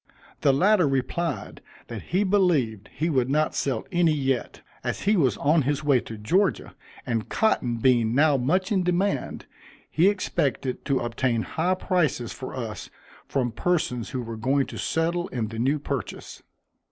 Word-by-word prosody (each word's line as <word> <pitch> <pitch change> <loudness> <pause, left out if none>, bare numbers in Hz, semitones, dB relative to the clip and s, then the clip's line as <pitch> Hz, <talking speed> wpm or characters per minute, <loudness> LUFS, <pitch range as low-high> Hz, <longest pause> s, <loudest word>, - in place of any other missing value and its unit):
The 140 - +4
latter 180 +4 +4
replied, 135 - -2 0.2
that 115 -3 -7
he 185 +4 0
believed 160 - +1
he 160 - -2
would 130 -6 +1
not 155 +2 +1
sell 130 -5 -1
any 175 -3 +3
yet, 135 -3 -2 0.2
as - - -3
he 210 +2 +3
was 140 -9 +2
on 155 +3 +3
his 145 +2 -1
way 140 -4 +4
to 115 -1 -8
Georgia, 170 - 0 0.3
and 115 -3 -2
cotton 125 - +1
being 120 -1 +3
now 150 +1 +4
much 170 - 0
in 195 -3 +2
demand, 180 +3 -1 0.5
he 175 +5 +4
expected 140 - -2
to 140 -2 +1
obtain 120 -1 0
high 175 +3 0
prices 170 - 0
for 130 - -7
us 115 -5 -6 0.4
from 125 -3 -1
persons 125 -4 -1
who 125 -1 -3
were 115 -1 -6
going 135 +4 +1
to - - -9
settle 170 +2 0
in 115 -4 -3
the 115 0 -6
new 135 +5 +2
purchase. 140 -7 -5
140 Hz, 165 wpm, -25 LUFS, 120-175 Hz, 0.5 s, The